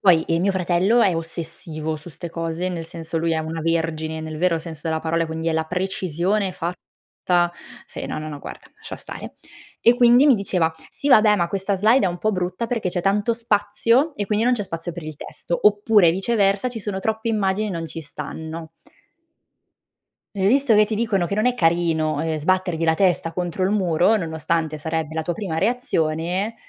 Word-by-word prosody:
Poi 170 -5 +5
e 165 0 0
mio 195 +3 +2
fratello 185 +5 +2
è 185 -5 +3
ossessivo 165 -1 -4
su 155 +2 -10
'ste 170 +2 -7
cose, 165 +2 -3
nel 170 -2 -4
senso 165 0 -5
lui 165 +1 0
è 160 - +1
una 160 +1 -4
vergine, 160 -1 -1
nel 155 -1 -6
vero 170 -1 +2
senso 160 -1 -8
della 160 0 0
parola, 165 +1 0
quindi 160 0 -5
è 165 - +2
la 160 0 +1
precisione 185 +2 -1
fatta 175 0 -4 1.1
sì, - - -7
no, - - -4
no, 155 0 -5
no, 145 -2 -7
guarda, - - -10
lascia - - -9
stare. - - -8 0.4
E 235 - +5
quindi 245 +2 +6
mi 280 - +7
diceva: 180 -6 0 0.2
"Sì - - -5
vabbè, 215 -6 +6
ma 170 -3 +1
questa 195 +2 -1
slide 220 +6 +4
è - - +2
un 175 0 -5
po' 215 +3 0
brutta 185 +4 -2
perché 225 -5 -1
c'è 175 0 -1
tanto 205 +5 +1
spazio, 230 +6 +1
e 205 - -2
qui 210 +2 +1
non 245 +2 +3
c'è 220 -4 -1
spazio 165 -1 -5
per 170 -1 -8
il 155 0 -6
testo". 170 +3 -5
Oppure, 205 -3 +5
viceversa, 200 +3 +1
ci 235 -2 -7
sono 200 -1 -3
troppe 220 +3 -2
immagini 210 -1 0
e - - -4
non 165 -3 -4
ci 165 - -7
stanno. 160 +2 -7 1.6
E 195 -1 +1
visto 265 +1 +4
che 210 0 +6
ti 215 +1 -3
dicono 210 -5 +1
che 200 - -2
non 215 +2 +1
è 250 - +3
carino, 165 -5 +1
ehm, 160 -1 -1
sbattergli 180 0 0
la 160 - +4
testa 175 -3 +1
contro 175 +1 -2
il 195 - +1
muro, 185 +1 +3
nonostante 160 -3 -1
sarebbe 160 0 -3
la 160 0 -2
tua 175 - -2
prima 170 -3 -4
reazione, 180 -2 0
175 Hz, 200 wpm, -22 LUFS, 160-210 Hz, 1.6 s, mi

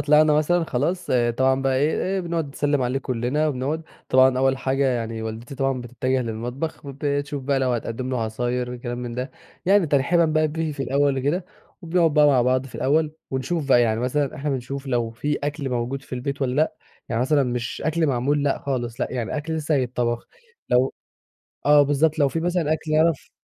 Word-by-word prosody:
طلعنا 150 +1 +5
مثلًا 165 +3 +2
خلاص، 170 +7 -1 0.3
طبعًا 130 0 +2
بقى 135 -1 +1
إيه 150 +4 +1
إيه 190 0 0
بنقعد 165 -4 -2
نسلم 145 -1 0
عليه 125 +2 0
كلنا 130 +4 -1
وبنقعد، 145 +4 -2 0.3
طبعًا 130 0 +5
أوّل 135 0 +3
حاجة 135 +1 0
يعني 115 -3 -2
والدتي 110 +4 -6
طبعًا 135 -1 0
بتتجه 125 +2 -1
للمطبخ، 120 +7 -4
وبتشوف 140 0 -2
بقى 140 0 +1
لو 130 -1 +1
هتقدم 120 +2 -3
له 125 -2 -1
عصاير 120 +3 -2
وكلام 120 0 -5
من 120 -1 -5
ده، 125 +2 -4 0.4
يعني 195 -3 +5
ترحيبًا 150 +5 +3
بقى 155 0 +2
بيه 160 0 -2
في 140 -1 -4
الأوّل 140 +1 +1
وكده، 155 +7 0 0.4
وبنقعد 165 -2 +2
بقى 150 -1 +6
مع 130 -4 +4
بعض 130 +1 +1
في - - -15
الأوّل، 155 +2 +1 0.2
ونشوف 140 +3 -2
بقى 120 -2 +6
يعني، 110 -1 +1
مثلًا 140 +3 -1
إحنا 145 +2 -2
بنشوف 135 +1 -4
لو 120 -3 0
في 145 +6 -2
أكل 145 -2 -3
موجود 125 +3 -2
في - - -7
البيت 140 +3 -3
والّا 130 -1 0
لأ، 155 +1 +2 0.3
يعني 115 - -1
مثلًا 140 +2 +3
مش 120 -2 -3
أكل 160 0 +1
معمول 140 +2 +1
لأ، 140 -1 +1
خالص 120 -4 -3
لأ - - +1
يعني 120 +3 -2
أكل 160 +2 -3
لسّه 155 0 0
هيتطبخ 120 -2 -1 0.4
لو 125 +2 +3 0.7
آه، 145 0 +7
بالضبط، 145 +2 +2
لو 140 - +5
في 165 - -2
مثلًا 170 -2 +1
أكل 155 0 -4
يعرف 160 -1 +2
135 Hz, 195 wpm, -23 LUFS, 125-150 Hz, 0.7 s, آه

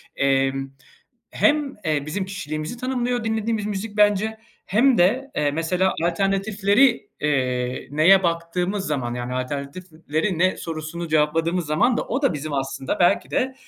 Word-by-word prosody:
emm, 135 0 +1 0.6
hem, 295 -2 +1
eee, 150 -2 0
bizim 190 +5 -2
kişiliğimizi 155 -2 -5
tanımlıyor, 245 -2 -1
dinlediğimiz 220 -1 -1
müzik, 210 +1 -4
bence, 210 +1 +2 0.3
hem 235 +5 +3
de, 250 +10 +2
eee, 145 -1 +2
mesela, 180 +5 0
alternatifleri, 200 +6 +2
eee, 125 -3 -1
neye 170 +6 +5
baktığımız 175 +3 -1
zaman, 125 -5 -2
yani, 125 +1 -4
"Alternatifleri 155 +6 -3
ne?" 185 +2 +2
sorusunu 165 +1 -5
cevapladığımız 160 +3 +1
zaman 230 +12 +2
da - - 0
o 260 +5 -3
da 275 - +3
bizim 150 +1 -5
aslında, 135 -1 -3
belki 175 - +3
de, 260 +1 0
175 Hz, 135 wpm, -23 LUFS, 150-210 Hz, 0.6 s, neye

